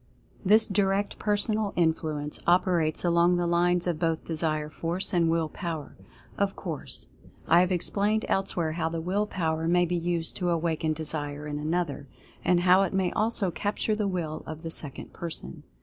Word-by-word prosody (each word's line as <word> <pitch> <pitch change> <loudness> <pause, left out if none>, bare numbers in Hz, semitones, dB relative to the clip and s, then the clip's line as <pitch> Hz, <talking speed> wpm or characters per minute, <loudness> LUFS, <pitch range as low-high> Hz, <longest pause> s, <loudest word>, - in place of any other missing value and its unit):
This 215 +3 +6
Direct 200 0 0
Personal 210 0 +1
Influence 155 -3 0
operates 175 -2 +2
along 170 +1 +4
the 175 - 0
lines 175 +1 +2
of 170 -4 -1
both 165 -1 0
Desire 155 -2 -1
Force 170 +5 -3
and 170 -2 +3
Will 165 -1 +1
Power, 160 -3 -5 0.5
of 200 -1 +1
course. 165 -7 -6 0.4
I 170 - +6
have 180 +1 +2
explained 205 +4 +1
elsewhere 175 -4 0
how 160 0 -1
the 165 0 -3
Will 195 +5 -1
Power 160 -4 -1
may 175 +1 +4
be 175 +1 -1
used 170 -1 0
to 180 -2 -1
awaken 165 -2 0
Desire 150 -2 -4
in 150 0 -4
another; 155 -2 -2 0.4
and 175 -1 +3
how 185 +1 +6
it 195 - 0
may 190 -2 +1
also 215 -3 +1
capture 210 +3 -1
the 210 -1 -1
Will 170 -5 -3
of 155 +1 -7
the 165 - -4
second 145 -3 -5
person. 155 - -4
170 Hz, 170 wpm, -27 LUFS, 160-190 Hz, 0.5 s, This